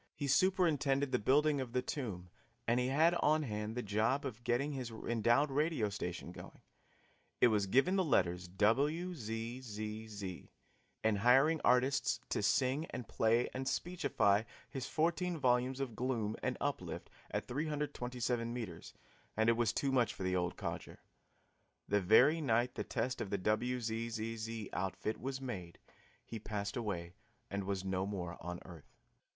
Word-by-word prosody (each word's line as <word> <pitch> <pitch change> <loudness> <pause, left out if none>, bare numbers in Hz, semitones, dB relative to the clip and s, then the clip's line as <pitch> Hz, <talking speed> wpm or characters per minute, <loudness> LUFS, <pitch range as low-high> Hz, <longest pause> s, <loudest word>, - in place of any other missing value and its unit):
He 145 - -3
superintended 145 -5 +3
the 125 - +2
building 145 +5 +3
of 120 -2 -6
the 125 - +1
tomb 95 - -4 0.4
and 120 +2 +3
he 125 - +1
had 155 +6 +4
on 155 +1 +3
hand 105 -2 -4
the 125 - -1
job 110 +7 +1
of 120 -3 -6
getting 125 +5 +1
his 130 -4 -4
endowed 120 +5 +1
radio 145 -6 +1
station 90 -3 -5
going - - -11 0.8
it 125 - +6
was 105 -3 +1
given 135 - +3
the 190 - +3
letters 90 - +1
WZZZ 110 - -2 0.5
and 110 -2 +2
hiring 135 +8 +5
artists 130 +2 +3
to - - 0
sing 130 +9 +2
and 125 -1 -6
play 115 +2 +2
and 130 +1 -3
speechify 135 - +2 0.3
his 135 -3 -4
fourteen 170 +2 0
volumes 125 -1 +2
of 130 -5 -3
gloom 115 -4 -1
and - - -1
uplift - - -3 0.2
at - - -2
327 125 -5 -2
meters, 110 -9 -6 0.4
and 110 +1 +4
it - - +6
was 115 -2 +2
too 135 +2 0
much 125 -4 +2
for - - -5
the 95 0 +1
old 90 -1 -1
codger. - - -6 0.8
The 105 0 +2
very 130 - +6
night 120 -2 +2
the - - -3
test 130 +1 -2
of 100 - -3
the 100 - 0
WZZZ 115 0 -2
outfit 95 +3 -2
was 135 +1 -3
made 95 -10 -6 0.5
he 115 - -6
passed 100 -1 -4
away 90 -7 -3 0.4
and 100 -1 -2
was 95 -1 -2
no 95 0 -1
more 90 -4 -4
on 90 +1 -5
earth. 85 -5 -13
120 Hz, 155 wpm, -35 LUFS, 105-135 Hz, 0.8 s, it